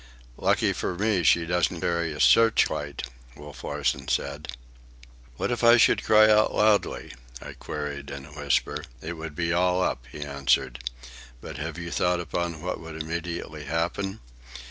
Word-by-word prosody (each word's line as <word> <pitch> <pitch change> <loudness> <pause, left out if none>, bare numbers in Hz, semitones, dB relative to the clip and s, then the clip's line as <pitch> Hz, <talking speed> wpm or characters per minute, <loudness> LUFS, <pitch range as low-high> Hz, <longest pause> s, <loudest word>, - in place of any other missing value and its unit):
"Lucky - - +2
for 90 - -3
me 105 0 +1
he 85 0 +4
doesn't 90 0 0
carry 85 -1 0
a 75 - -7
searchlight," 90 - +3 0.3
Wolf 75 -1 -11
Larsen 70 -1 -2
said. 70 +2 -2 0.9
"What - - -1
if 120 0 -2
I 115 +1 +8
should - - +4
cry 110 0 +6
out 110 0 +4
loudly?" 105 -1 +2 0.3
I - - -9
queried 75 -2 -6
in 70 -1 -7
a 75 - -15
whisper. 75 -1 -1 0.2
"It 80 +5 -5
would 80 -2 -7
be 85 +1 0
all 90 +1 +2
up," - - -2
he 75 - -6
answered. 70 -4 0 0.6
"But 75 +4 -8
have 80 +2 -5
you 85 -1 -6
thought 90 -1 +1
upon 85 -1 -3
what 90 - -3
would 80 -1 -8
immediately 80 -1 -5
happen?" 85 +6 -2
80 Hz, 160 wpm, -26 LUFS, 75-90 Hz, 0.9 s, I